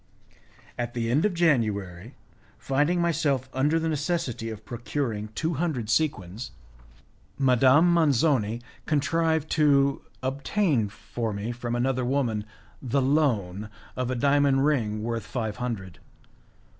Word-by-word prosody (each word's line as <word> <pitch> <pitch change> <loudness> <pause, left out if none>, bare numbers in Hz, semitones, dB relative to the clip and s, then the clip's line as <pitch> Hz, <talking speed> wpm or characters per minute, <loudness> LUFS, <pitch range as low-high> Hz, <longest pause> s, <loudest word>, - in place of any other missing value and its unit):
At 120 0 -3
the 115 -1 -1
end 145 +9 +3
of 205 -4 0
January, 110 - 0 0.4
finding 145 +8 +1
myself 150 -6 +1
under 145 +5 +2
the 165 - -1
necessity 150 -7 -2
of 110 -1 -8
procuring 120 -2 -3
two 165 +6 -1
hundred 135 -8 -2
sequins, 115 - -1 0.9
Madame 135 +6 +5
Manzoni 135 -8 +2 0.2
contrived 160 +1 +1
to 140 -3 +3 0.2
obtain 135 - 0
for 115 +1 -5
me 100 +4 -3
from 120 0 -4
another 130 +1 0
woman 120 -5 0 0.4
the 135 +1 0
loan 115 -9 +1 0.3
of 125 -1 -2
a 130 - -1
diamond 140 +1 +3
ring 110 -8 0
worth 115 0 -2
five 110 -4 -4
hundred. 110 -8 -5
130 Hz, 120 wpm, -26 LUFS, 115-150 Hz, 0.9 s, Madame